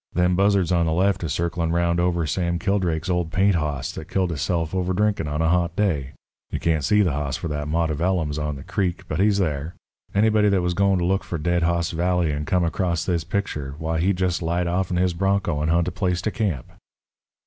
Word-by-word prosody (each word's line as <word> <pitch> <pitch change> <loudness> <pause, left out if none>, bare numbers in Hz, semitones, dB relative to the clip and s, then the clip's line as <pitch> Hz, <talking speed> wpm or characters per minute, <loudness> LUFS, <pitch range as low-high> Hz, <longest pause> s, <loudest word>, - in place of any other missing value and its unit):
Them 90 +1 +2
buzzards 100 -2 +2
on 85 -2 +2
the 80 - +1
left 95 +2 +1
is 80 - -2
circlin' 85 0 -1
'round 85 0 +1
over 85 -1 +1
Sam 85 +2 -1
Kildrake's 90 -4 0
old 90 -3 0
paint 95 +3 +3
hoss 75 -5 -2
that 80 - -9
killed 95 -2 0
hisself 80 +1 -1
over 95 0 0
drinkin' 105 -4 +1
on 75 +2 -1
a 80 - +2
hot 85 -1 +1
day. 75 -10 0 0.4
You - - -3
can't 80 -3 +1
see 105 +9 +4
the 90 - +1
hoss 70 -1 -2
for 85 - -4
that 75 -1 -3
mott 80 +1 0
of 75 - -3
ellums 85 -4 0
on 75 -1 -2
the 70 - -9
creek, 95 -4 -2
but - - -3
he's 100 0 +3
thar. 80 -3 -2 0.4
Anybody 105 0 +4
that 95 -3 +2
was 90 0 0
goin' 100 +1 +2
to 85 - 0
look 95 +2 +1
for 85 - -4
Dead 85 +2 0
Hoss 85 0 +1
Valley 85 -1 +1
and 75 +1 -3
come 90 -3 +2
across 85 0 -1
this 85 -3 0
picture, 75 -6 -3
why, 80 +1 -2
he'd 90 +2 +1
just 90 -1 0
light 85 +2 0
off'n 90 +1 -1
his 90 0 +2
bronco 95 -4 0
and 75 - 0
hunt 85 +1 +2
a - - -1
place 90 -1 -1
to 110 - 0
camp." 90 - -2
85 Hz, 230 wpm, -23 LUFS, 80-95 Hz, 0.4 s, see